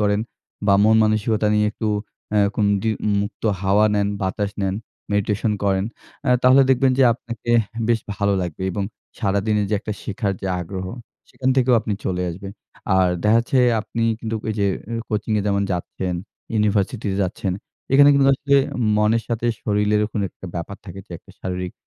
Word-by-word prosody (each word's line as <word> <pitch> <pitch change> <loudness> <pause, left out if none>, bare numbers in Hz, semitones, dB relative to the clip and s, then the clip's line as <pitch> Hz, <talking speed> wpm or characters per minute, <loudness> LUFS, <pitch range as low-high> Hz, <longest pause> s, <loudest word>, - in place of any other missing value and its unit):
করেন 105 0 +2 0.5
বা 100 - +5
মন 110 +1 +5
মানসিকতা 110 0 +1
নিয়ে 105 0 +3
একটু 110 -2 -3 0.4
অ্যা 105 - +4 0.2
কোন 105 - +2 0.2
দি 110 - +1 0.3
মুক্ত 105 0 -5 0.2
হাওয়া 100 +2 +4
নেন, 100 0 +1
বাতাস 100 +2 -1
নেন, 95 0 0 0.4
মেডিটেশন 105 +1 +1
করেন, 95 0 +2 0.4
অ্যা 125 - +3
তাহলে 130 +2 +7
দেখবেন 130 +1 +4
যে - - +6
আপনাকে 115 -1 -6
অ্যাহ 115 +2 -7
বেশ 115 -1 +3
ভালো 100 -1 +1
লাগবে 90 +1 -5
এবং 100 - -2 0.4
সারাদিনের 105 0 +1
যে - - +2
একটা 105 - -4
শেখার 100 -1 -2
যে 95 - -4
আগ্রহ, 95 +1 -5 0.4
সেখান 130 0 -1
থেকেও 125 -1 +4
আপনি 105 - -3
চলে 90 -1 -1
আসবেন। 95 +3 -8 0.4
আর 95 -1 +4
দেখা 110 +2 +5
যাচ্ছে 130 +2 0 0.2
আপনি 115 +1 -4 0.2
কিন্তু 110 -1 -3
ঐ - - +1
যে 100 - +3 0.3
আ - - -1
কোচিং-এ 105 0 0
যেমন 100 0 +1
যাচ্ছেন, 90 +1 -3 0.4
ইউনিভার্সিটিতে 105 0 0
যাচ্ছেন, 95 0 -2 0.4
এখানে 140 +1 +7
কিন্তু 140 -1 +4
আসলে 140 +1 +2 0.4
মনের 110 +2 +2
সাথে 115 0 -1 0.2
শরীরেরও 105 0 +1
কোনো 105 - -1
একটা 95 - -11
ব্যাপার 85 +4 -5
থাকে 95 -1 -9
যে - - -44
একটা - - -19
শারীরিক 90 -1 -4
105 Hz, 175 wpm, -22 LUFS, 100-115 Hz, 0.5 s, তাহলে